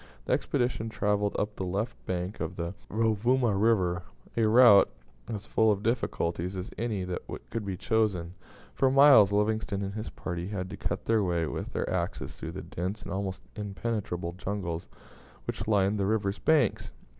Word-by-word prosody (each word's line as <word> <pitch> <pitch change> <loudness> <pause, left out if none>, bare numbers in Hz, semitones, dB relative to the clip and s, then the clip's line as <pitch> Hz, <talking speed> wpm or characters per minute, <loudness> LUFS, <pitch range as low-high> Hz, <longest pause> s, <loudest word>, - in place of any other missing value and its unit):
The - - +1
expedition 120 -2 0
travelled 105 -2 0
up 105 0 -1
the - - -4
left 100 +5 -2
bank 90 +2 -3
of 80 - -3
the 85 +1 -3 0.2
Rovuma 115 +2 +2
River, 95 -4 +2 0.3
a 115 -2 +3
route 115 -2 +7 0.4
as 105 -1 -5
full 110 -1 +3
of 100 0 -1
difficulties 95 -6 -1
as 90 - -5
any 110 -4 -2
that 90 -1 -3 0.3
could 115 - -2
be 95 -2 -4
chosen. 100 -6 0 0.4
For 135 - +3
miles 135 -7 +7
Livingstone 105 -1 0
and 100 0 -4
his 110 +1 -5
party 90 -1 -5
had 95 -3 -4
to - - -4
cut - - -3
their 110 -2 +3
way 85 -3 0
with - - -5
their - - -1
axes - - -2
through - - -6
the - - -6
dense 95 +5 -4
and - - -7
almost 95 -1 -3
impenetrable 100 -4 -3
jungles 90 -3 -4 0.6
which 105 - -4
lined 100 -1 +2
the 95 - +1
river's 100 -2 0
banks. 155 -3 +2
100 Hz, 170 wpm, -29 LUFS, 95-110 Hz, 0.6 s, route